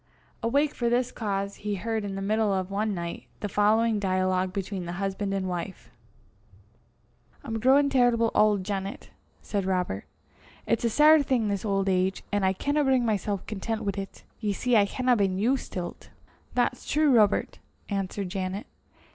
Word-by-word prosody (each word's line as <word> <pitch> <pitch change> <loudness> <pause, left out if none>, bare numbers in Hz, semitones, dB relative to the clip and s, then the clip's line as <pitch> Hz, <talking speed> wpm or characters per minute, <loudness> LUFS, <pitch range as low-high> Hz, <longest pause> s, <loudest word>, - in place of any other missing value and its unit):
Awake 280 +6 +1
for 235 -1 0
this 245 +1 +1
cause, 200 -2 -3
he 210 0 -3
heard 220 +2 -2
in 200 -1 -4
the 195 - -4
middle 215 +1 +1
of 190 -1 -1
one 210 +1 -1
night, 170 -1 -5
the 205 - -1
following 215 +2 +2
dialogue 185 -1 0
between 195 -1 -4
the 175 - -4
husband 195 +2 -2
and 195 -1 -1
wife. 180 +1 -5 1.5
"I'm 225 0 -3
growin' 270 +5 +5
terrible 240 -3 +3
auld, 210 -3 +3
Janet," 195 0 -5 0.3
said 200 -2 -2
Robert. 180 - -1 0.6
"It's 230 - 0
a 235 - +2
sair 305 +5 +6
thing, 250 -6 +1
this 200 +1 -2
auld 195 -2 0
age, 185 0 +1
an' 205 -1 0
I 190 - +4
canna 285 +10 0
bring 260 -3 +3
mysel' 205 -3 -1
content 220 +2 -3
wi' 200 - +1
't. 195 0 -7 0.2
Ye 210 -2 -1
see 245 +4 +1
I 205 -2 +6
haena 250 +4 +1
been 195 -4 +1
used 250 +7 0
till 180 -2 -3
't." - - -19 0.5
"That's 250 0 0
true, 295 -3 +4
Robert," 210 -3 +2 0.3
answered 195 -1 -3
Janet. 190 +3 -3
205 Hz, 170 wpm, -27 LUFS, 195-230 Hz, 1.5 s, sair